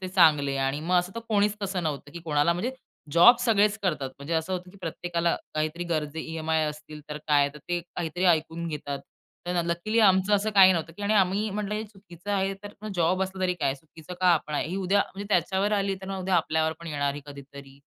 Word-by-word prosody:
ते 185 - -5
चांगले. 150 -7 +4
आणि 135 +2 -1
मग 170 +4 -1
असं 180 +1 -2
तर 230 - -4
कोणीच 210 -1 +2
तसं 190 -2 -2
नव्हतं 145 -3 -4
की 170 - -7
कोणाला 150 +1 +2
म्हणजे 200 +9 -2 0.4
जॉब 175 +10 +8
सगळेच 215 -3 +3
करतात. 150 -8 -1
म्हणजे 140 +4 -4
असं 160 +3 -1
होतं 180 0 -4
की 200 - -17
प्रत्येकाला 170 0 -1 0.2
काहीतरी 155 +3 -2
गरजे 160 -2 -2
ई-एम-आय 160 -1 -1
असतील 150 0 -7
तर, 150 - -5
काय 145 -1 +4
तर - - -10
ते 175 0 0
काहीतरी 175 +1 -4
ऐकून 170 0 +1
घेतात. 145 -2 -4 0.5
तर 175 -1 0
लकीली 175 +7 -1
आमचं 195 -1 +5
असं 205 +2 +1
काही 190 -2 +8
नव्हतं, 165 -1 -3
की 205 - -8
आम्ही 200 +1 +2
म्हंटलं, 210 +1 -3
"हे 215 +1 -3
चुकीचं 195 -2 -11
आहे." 195 -1 +1
तर 205 +1 -9
जॉब 180 +2 +2
असलं 190 0 -5
तरी 180 -1 +1
काय, 140 -6 0
चुकीचं 160 +4 -12
का 185 - +2
आपण 150 -1 -3
आहे? 145 - 0
ही 185 - -3
उद्या 195 +1 +2
म्हणजे 200 +1 -6
त्याच्यावर 190 +2 +1
आली 200 -1 +1
तर - - -7
मग, 195 0 -3
उद्या 185 0 0
आपल्यावर 160 -1 +1
पण 170 - -9
येणार 145 -3 -1
आहे 145 - -7
कधीतरी. 140 -1 -12
175 Hz, 220 wpm, -26 LUFS, 155-195 Hz, 0.5 s, जॉब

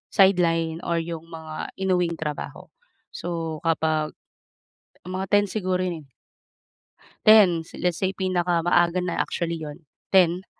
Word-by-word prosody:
sideline 165 -4 +3
or 170 - +1
iyong 165 0 -5
mga 160 -2 -7
inuwing 180 -3 0
trabaho. 150 -2 -6 0.4
So, 165 -3 -4
kapag, 155 -1 0 0.9
mga 185 +2 -4
10:00 205 0 +5
siguro 185 -3 -1
yun 170 -5 -3
eh. - - -29 1.2
10:00, 190 -7 +6 0.2
let's 175 -2 0
say 190 0 0
pinaka 180 -3 0
maaaga 175 +1 +2
na 180 - -2
actually 170 -1 -2
iyon, 155 +1 -8 0.3
10:00. 180 0 +4
170 Hz, 125 wpm, -24 LUFS, 165-185 Hz, 1.2 s, 10:00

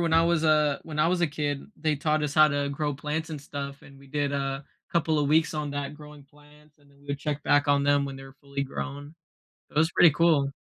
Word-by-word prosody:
when 170 -1 0
I 165 - +6
was 170 -1 +1
a 150 -2 +3
when 155 -2 -7
I 155 - +4
was 180 0 +1
a 170 - +3
kid, 145 -2 -3
they 155 -1 0
taught 155 +1 0
us 145 -1 -2
how 155 -1 +7
to 145 0 -1
grow 145 +1 -2
plants 150 +3 -4
and 150 -3 -5
stuff, 140 -1 -7
and 135 -1 -15
we 140 - -16
did 145 0 -1
a 135 0 -2 0.3
couple 160 -2 +1
of 145 -1 +1
weeks 160 +1 +3
on 150 -1 -3
that 145 0 -4
growing 150 -1 -13
plants, 150 +1 -22
and 145 -1 -25
then 140 - -24
we 145 - -21
would 140 0 -3
check 150 0 -3
back 145 0 +3
on 140 0 +3
them 145 0 +3
when 135 -1 -6
they're 135 0 -11
fully 140 0 -5
grown. 145 +2 -6 0.6
It - - -19
was 160 +2 +4
pretty 175 - +7
cool. 150 -3 +3
145 Hz, 255 wpm, -27 LUFS, 140-155 Hz, 0.6 s, how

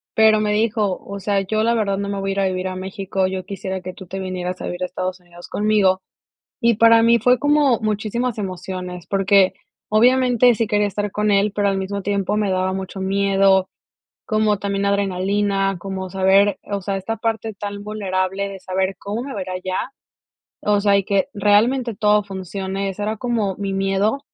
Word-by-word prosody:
pero 220 -1 +5
me 210 -1 +1
dijo: 210 -3 +1
"O 200 0 -6
sea, 195 0 0
yo 215 +3 -1
la 235 +1 +2
verdad 200 -3 0
no 200 0 -3
me 200 -1 -3
voy 195 0 -2
a - - -1
ir 200 - -2
a 195 - +2
vivir 185 0 -2
a 185 - -4
México, 190 0 -2
yo 185 -1 -4
quisiera 190 -1 -5
que 185 0 -7
tú 190 -3 -12
te 195 +2 -5
vinieras 185 -1 -4
a - - -4
vivir 175 +1 -5
a - - +1
Estados 185 0 -4
Unidos 175 0 -14
conmigo". 205 -3 +2 0.6
Y 235 -1 +4
para 230 +1 +6
mí 235 0 +5
fue 250 +1 +4
como 290 -4 +3
muchísimas 220 +2 -2
emociones, 185 -2 -5
porque, 195 -1 +3 0.4
obviamente 245 +1 +4
sí 230 - 0
quería 210 -1 +1
estar 205 +1 -3
con 210 0 0
él, 200 +1 +2
pero 205 -1 +1
al 195 - 0
mismo 195 +1 -3
tiempo 200 +1 -1
me 205 -2 0
daba 185 0 0
mucho 190 0 -5
miedo, 195 0 +3 0.6
como 215 -1 +2
también 200 0 -1
adrenalina, 195 0 0
como 190 -1 -5
saber, 195 +2 +3
eh, 205 - -7
o 200 - -1
sea, 195 +1 -2
esta 225 +4 -3
parte 225 0 -2
tan 205 0 -6
vulnerable 195 -2 -2
de 195 -1 -8
saber, 190 +1 -2
¿cómo 215 +5 -4
me 275 - -6
va 200 - -4
a - - -3
ir 185 - -9
allá? 185 +7 -3 0.7
O 205 -1 +2
sea, 200 -1 +4
y 195 - +1
que 195 -1 0
realmente 220 +3 +2
todo 210 -1 +3
funcione. 195 0 -4
Ese 195 +2 -6
era 215 +1 -2
como 225 -6 -1
mi 200 -1 -3
miedo 195 +6 +1
200 Hz, 205 wpm, -21 LUFS, 190-215 Hz, 0.7 s, para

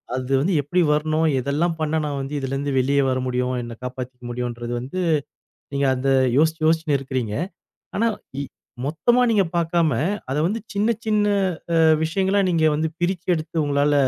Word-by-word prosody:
அது 130 +1 -4
வந்து 180 +6 +1
எப்படி 175 +6 +1
வரணும்? 155 +1 +1
எதெல்லாம் 150 +6 0
பண்ணா 155 0 0
நான் 145 -2 -3
வந்து 135 +2 -6
இதிலிருந்து 135 +1 -2
வெளிய 140 +2 +2
வர 130 - +1
முடியும்? 125 0 0
என்ன 120 0 -7
காப்பாத்திக்க 125 0 -6
முடியுன்றது 120 0 -4
வந்து 135 +10 -5 0.7
நீங்க 140 0 +1
அதை 135 +1 +1 0.2
யோசிச்சு 160 +1 +2
யோசிச்சு 160 -2 +2
இருக்கிறீங்க. 130 -5 -3 0.6
ஆனா 230 +2 +2 0.8
மொத்தமா 240 +11 +2
நீங்க 205 -3 +3
பாக்காம 170 -2 +2 0.4
அதை 135 - 0
வந்து 220 +4 -1
சின்ன 205 +2 +1 0.2
சின்ன 210 -1 +2 0.8
விஷயங்களா 190 +4 +1
நீங்க 165 -2 +2
வந்து 160 +2 0
பிரிச்சு 175 0 -1
எடுத்து 160 +1 -5
உங்களால 145 0 +2
150 Hz, 150 wpm, -22 LUFS, 130-170 Hz, 0.8 s, நீங்க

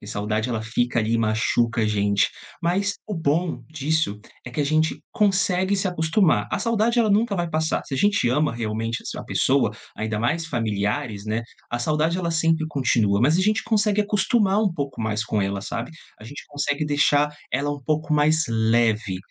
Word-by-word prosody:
porque 105 - -12
saudade 110 +2 -1
ela 115 -3 -2
fica 120 +2 0
ali, 110 +1 0
e 115 - +2
machuca 115 +1 +1
a - - +2
gente, 100 -2 +2 0.3
mas 195 +4 +1
o 210 - -5
bom 165 +1 0
disso 155 -7 -1 0.3
é - - -5
que 125 - -3
a - - +2
gente 155 +2 +1
consegue 190 -1 +2
se 195 0 0
acostumar, 160 - +2
a - - 0
saudade 230 +1 +1
ela 225 -3 +3
nunca 210 +1 +2
vai 175 -1 -1
passar, 160 +1 0
se - - -12
a - - -1
gente 205 -3 +2
ama, 145 0 +1
realmente, 115 0 -3
es - - -6
a - - -6
pessoa, - - +2 0.3
ainda 110 -1 -2
mais 160 +9 0
familiares, 105 -4 -2
né, 110 +2 -1 0.3
a 120 - -1
saudade 155 +6 +1
ela 170 -2 -1
sempre 165 -1 +1
continua, 115 -8 +1
mas 150 +7 +4
a - - +4
gente 215 +2 +2
consegue 210 -2 +2
acostumar 210 0 +2
um 200 - +1
pouco 140 -6 -4
mais 110 0 -1
com 105 -2 0
ela, 100 0 -2
sabe, 100 - -5 0.3
a 105 - -11
gente 140 +6 -9
consegue 145 0 -2
deixar 145 0 +3 0.2
ela 140 +3 0
um 145 -1 -5
pouco 155 +1 -1
mais 155 +2 +3
leve. 110 -3 +1
145 Hz, 195 wpm, -23 LUFS, 110-170 Hz, 0.3 s, mas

